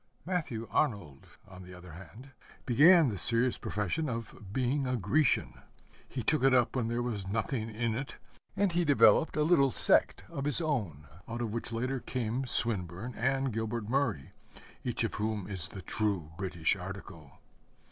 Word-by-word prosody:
Matthew 150 Hz, -11 st, -3 dB
Arnold, 100 Hz, -, -1 dB, 0.2 s
on 95 Hz, -1 st, -12 dB
the 90 Hz, 0 st, -11 dB
other 90 Hz, -1 st, -12 dB
hand, 110 Hz, -, -12 dB, 0.3 s
began 155 Hz, +5 st, +6 dB
the 100 Hz, -4 st, -4 dB
serious 120 Hz, +2 st, +2 dB
profession 105 Hz, -, -2 dB
of 115 Hz, -4 st, -7 dB
being 130 Hz, +4 st, 0 dB
a 125 Hz, 0 st, 0 dB
Grecian. 120 Hz, -, +1 dB, 0.5 s
He 125 Hz, -, -4 dB
took 155 Hz, +2 st, +1 dB
it 135 Hz, -1 st, +5 dB
up 125 Hz, 0 st, +2 dB
when 125 Hz, -3 st, 0 dB
there 120 Hz, +1 st, -1 dB
was 105 Hz, -6 st, -4 dB
nothing 110 Hz, +3 st, -2 dB
in 115 Hz, +1 st, -2 dB
it, 135 Hz, +5 st, -5 dB, 0.4 s
and 200 Hz, -2 st, +1 dB
he 175 Hz, +1 st, +1 dB
developed 150 Hz, +1 st, +4 dB
a 150 Hz, -, +3 dB
little 150 Hz, -5 st, +4 dB
sect -, -, +2 dB
of 140 Hz, -4 st, -5 dB
his 145 Hz, +2 st, 0 dB
own, 105 Hz, -, -2 dB, 0.2 s
out 115 Hz, +1 st, -5 dB
of 110 Hz, -3 st, -3 dB
which 115 Hz, +1 st, -2 dB
later 125 Hz, +4 st, -2 dB
came 125 Hz, +1 st, -3 dB
Swinburne 105 Hz, -1 st, +1 dB
and 135 Hz, +1 st, 0 dB
Gilbert 110 Hz, 0 st, -3 dB
Murray, 125 Hz, -, -1 dB, 0.5 s
each -, -, -2 dB
of -, -, -2 dB
whom 105 Hz, -2 st, -3 dB
is 95 Hz, -3 st, +1 dB
the 95 Hz, -, -9 dB
true 100 Hz, -8 st, +1 dB
British 90 Hz, -2 st, -1 dB
article. 90 Hz, -6 st, -9 dB
115 Hz, 165 wpm, -30 LUFS, 100-135 Hz, 0.5 s, began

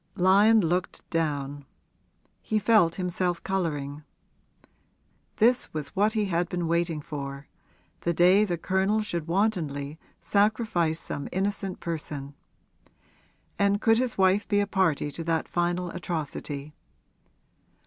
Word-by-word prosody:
Lyon 205 Hz, +4 st, +5 dB
looked 180 Hz, +1 st, -2 dB
down; 145 Hz, -3 st, -2 dB, 0.8 s
he 215 Hz, -, -1 dB
felt 210 Hz, -5 st, +4 dB
himself 180 Hz, -1 st, -2 dB
colouring. 150 Hz, -7 st, -2 dB, 1.3 s
This 240 Hz, +3 st, +3 dB
was 150 Hz, -2 st, -2 dB
what 210 Hz, +3 st, +2 dB
he 215 Hz, -2 st, +1 dB
had 175 Hz, -2 st, 0 dB
been 175 Hz, -2 st, -2 dB
waiting 170 Hz, -2 st, 0 dB
for 140 Hz, -1 st, -6 dB, 0.5 s
the 170 Hz, -, 0 dB
day 180 Hz, +4 st, +5 dB
the 175 Hz, -5 st, -1 dB
Colonel 190 Hz, +5 st, +1 dB
should 170 Hz, -6 st, -3 dB
wantonly 160 Hz, -7 st, -1 dB, 0.2 s
sacrifice 200 Hz, -6 st, +1 dB
some 145 Hz, -, -5 dB
innocent 195 Hz, 0 st, -2 dB
person. 145 Hz, -4 st, -5 dB, 1.3 s
And 200 Hz, 0 st, +3 dB
could 225 Hz, +1 st, +4 dB
his 255 Hz, -2 st, -1 dB
wife 190 Hz, +2 st, +3 dB
be 205 Hz, -, +2 dB
a 205 Hz, -, +2 dB
party 180 Hz, -7 st, +1 dB
to 165 Hz, -, -6 dB
that 165 Hz, -1 st, 0 dB
final 175 Hz, 0 st, -1 dB
atrocity? 150 Hz, -4 st, -5 dB
175 Hz, 120 wpm, -27 LUFS, 155-200 Hz, 1.3 s, Lyon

